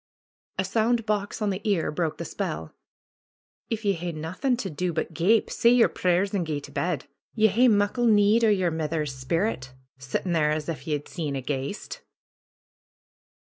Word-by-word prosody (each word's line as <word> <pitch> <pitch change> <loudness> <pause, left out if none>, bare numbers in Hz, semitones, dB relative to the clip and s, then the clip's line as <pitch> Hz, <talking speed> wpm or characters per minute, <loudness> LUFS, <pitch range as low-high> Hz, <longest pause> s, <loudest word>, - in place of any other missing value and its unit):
A 190 - 0
sound 225 +3 +1
box 210 0 -1
on 205 - +1
the 190 - -4
ear 200 -7 +1
broke 160 0 -2
the - - -5
spell. 80 +1 -4 1.0
^Tf 225 0 -2
ye 200 -1 +2
hae 175 0 -4
naethin' 180 - -1
to 200 -5 -3
do 175 +3 -2
but 160 +1 -3
gape, 195 +8 +2
say 235 - +4
yer 245 -1 +6
prayers 185 +2 +1
and 195 -3 +1
gae 155 -3 -2
to 140 - -12
bed. 145 0 -2 0.3
Ye 220 -1 +4
hae 240 +6 +4
muckle 210 +2 +2
need 210 +1 +5
o' 225 - +5
yer 185 -4 +2
mither's 155 -2 -2
sperrit, 130 - -2 0.3
sittin' 135 +7 -3
there 155 -2 +3
as 150 0 -1
if 150 -4 -5
ye'd 150 -2 -2
seen 155 -5 -4
a 135 - -2
ghaist." 145 - -4
180 Hz, 180 wpm, -26 LUFS, 150-215 Hz, 1.0 s, yer